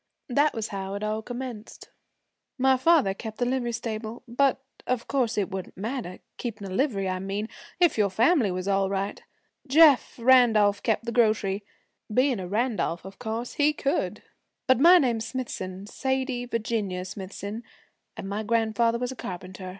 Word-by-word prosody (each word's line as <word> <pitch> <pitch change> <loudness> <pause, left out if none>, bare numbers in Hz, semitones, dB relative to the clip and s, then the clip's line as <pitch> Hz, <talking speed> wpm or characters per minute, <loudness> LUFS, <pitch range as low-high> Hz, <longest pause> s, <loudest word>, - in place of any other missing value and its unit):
'That 290 +4 +2
was 225 -1 -3
how 195 0 -4
it 200 - -5
all 215 +1 -1
commenced. 245 -2 -8 0.7
My 265 0 +4
father 265 - +4
kept 220 +2 -8
the 245 - 0
livery 245 -1 -1
stable. 225 0 -5
But 270 +4 +2 0.3
of 250 -2 -1
course 250 -5 0
it 205 -1 0
wouldn't 190 -1 -6
matter 215 -3 -4 0.2
keepin' 215 -4 -5
a 190 - -6
livery, 205 -5 0
I 185 0 -2
mean 195 +3 -3 0.3
if 345 -10 +3
your 205 -1 +3
family 230 - +3
was 185 +1 -3
all 195 -1 +2
right. 195 +1 -3 0.5
Jeff 295 -1 +6
Randolph 230 -5 +5
kept 230 0 0
the 235 - -2
grocery. 215 -4 +2 0.5
Being 255 0 +2
a 185 - -5
Randolph, 210 -4 -1
of 195 0 -11
course 230 0 -4
he 295 +1 +3
could. 285 +2 -2 0.4
But 260 -2 +4
my 345 +5 +8
name's 235 -7 +1
Smithson 200 -6 -5
Sadie 260 +1 -2
Virginia 215 -6 -2
Smithson 200 +3 -6 0.6
and 195 - -6
my 200 +2 -2
grandfather 230 +1 +1
was 250 +1 -3
a - - -7
carpenter. 185 -2 -7
225 Hz, 165 wpm, -26 LUFS, 200-255 Hz, 0.7 s, my